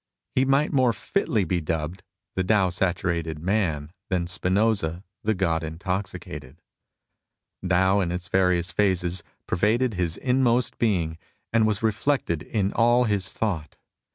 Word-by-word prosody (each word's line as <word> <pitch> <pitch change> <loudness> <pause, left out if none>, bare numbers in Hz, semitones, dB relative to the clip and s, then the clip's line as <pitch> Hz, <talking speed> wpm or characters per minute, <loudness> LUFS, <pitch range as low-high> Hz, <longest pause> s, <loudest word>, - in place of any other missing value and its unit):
He 130 - +3
might 140 +4 +2
more 130 -4 +4
fitly 110 - 0
be 90 0 -1
dubbed 80 +3 -3 0.2
'' 105 - -59
the 95 - +1
Tao 95 -1 +3
saturated 85 -3 -1
man 80 -4 -1
" 100 - -58
than 90 -3 0
Spinoza 95 -1 0
'' 95 - -58
the 110 0 +1
God 85 -3 0
intoxicated." 85 -4 -5 1.1
Tao 95 +2 +4
in 90 -3 0
its 90 0 -4
various 90 -2 +2
phases 90 -1 +1 0.2
pervaded 110 +6 +1
his 90 -3 -1
inmost 125 -1 +1
being 85 -8 0 0.3
and 110 -1 +4
was 110 +1 -1
reflected 110 - 0
in 100 -3 -1
all 120 +1 +4
his 100 -4 0
thought. 85 -9 -3
95 Hz, 145 wpm, -25 LUFS, 85-110 Hz, 1.1 s, more